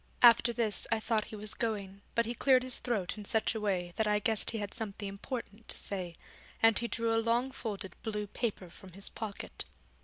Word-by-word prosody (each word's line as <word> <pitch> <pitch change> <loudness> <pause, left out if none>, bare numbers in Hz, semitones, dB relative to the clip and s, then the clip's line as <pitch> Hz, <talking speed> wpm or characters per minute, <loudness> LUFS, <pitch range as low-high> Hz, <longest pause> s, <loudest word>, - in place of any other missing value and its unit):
After 235 0 +8
this 230 -3 +2
I 225 - +3
thought 220 -1 +1
he - - -8
was 210 0 -2
going, 200 -4 -2
but 235 -1 +3
he 235 - -2
cleared 255 +1 +4
his 255 -1 +3
throat 215 -5 -1
in - - -6
such 220 +3 +2
a 220 - -3
way 180 -4 0
that 220 - +2
I 210 0 +4
guessed 215 +1 0
he 230 - -2
had 205 -1 -4
something 205 -2 -4
important 210 +1 -6
to - - -3
say, 180 -4 -3 0.4
and 225 -1 +6
he 235 - -1
drew 230 -1 0
a 225 - +3
long 235 +3 +2
folded 200 -8 -4
blue 210 -2 -2
paper 200 -4 -3
from 185 0 -13
his 195 +2 -5
pocket. 215 -3 -5
220 Hz, 215 wpm, -32 LUFS, 200-230 Hz, 0.4 s, After